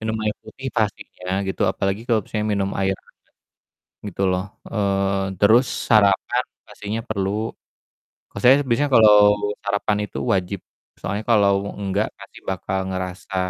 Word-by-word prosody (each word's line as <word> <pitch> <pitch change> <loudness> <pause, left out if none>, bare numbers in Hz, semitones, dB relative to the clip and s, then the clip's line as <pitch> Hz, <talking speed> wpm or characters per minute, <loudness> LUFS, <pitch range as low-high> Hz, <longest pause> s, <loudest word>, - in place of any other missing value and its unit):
minum 110 0 -2
air 105 0 0
putih 130 +5 -9
pastinya 95 -3 -2
gitu, 95 - -2
apalagi 95 +1 -1
kalo 115 -2 +4
misalnya 105 -1 -2
minum 100 -1 0
air 95 0 +2
anget - - -27 0.9
gitu 100 -1 -5
loh, 90 0 0 0.3
eee, 100 -2 0
terus 110 +5 +6 0.2
sarapan 110 +3 +3 0.2
pastinya 105 +1 -5
perlu. 100 -3 -1 1.0
Kalau - - -6
saya 125 +2 +8
biasanya 140 +4 +1
kalo 110 -2 +8 0.5
sarapan 100 +1 0
itu - - -8 0.2
wajib, 95 +1 -1 0.4
soalnya 100 +2 -3
kalo 105 -3 +5 0.3
nggak 100 -2 -1
pasti - - -14
bakal 95 0 -2
ngerasa 95 +1 -5
100 Hz, 140 wpm, -22 LUFS, 95-110 Hz, 1.0 s, saya